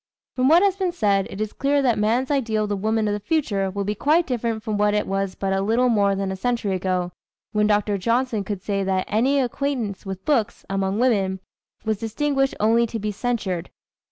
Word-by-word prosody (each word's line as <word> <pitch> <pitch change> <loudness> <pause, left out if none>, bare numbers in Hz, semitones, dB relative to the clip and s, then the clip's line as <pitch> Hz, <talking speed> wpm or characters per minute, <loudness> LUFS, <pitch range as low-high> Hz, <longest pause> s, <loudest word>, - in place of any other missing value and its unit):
From 255 0 +2
what 335 +6 +6
has 395 -2 +3
been 375 -2 0
said, 200 - +1
it 195 - -8
is 215 -1 -3
clear 285 +1 +1
that 240 -5 +2
man's 235 +6 +1
ideal 225 -6 +1
of 210 - -3
the 205 - 0
woman 215 +2 0
of 205 - 0
the 205 - -2
future 205 - 0
will 200 +1 -3
be 205 +1 -1
quite 310 - +2
different 230 -4 -2
from 215 -2 -2
what 210 0 +2
it 210 - +1
was 195 -1 -2
but 195 -1 -1
a 195 - +1
little 230 +5 +2
more 200 -3 +3
than 195 0 -2
a - - -3
century 230 -1 -1
ago, 185 -1 -1 0.4
when 210 -1 +2
Dr. 205 -1 +1
Johnson 230 +1 0
could 195 -2 -5
say 200 -1 -1
that 190 -1 0
"any 260 +6 +2
acquaintance 250 -5 -2
with 190 -2 -7
books," 240 -8 0
among 195 0 0
women, 200 -6 +1 0.5
"was 215 -2 0
distinguished 270 +4 0
only 230 +2 +3
to 225 - -4
be 210 0 -2
censured." 200 -6 -2
215 Hz, 215 wpm, -23 LUFS, 195-245 Hz, 0.5 s, what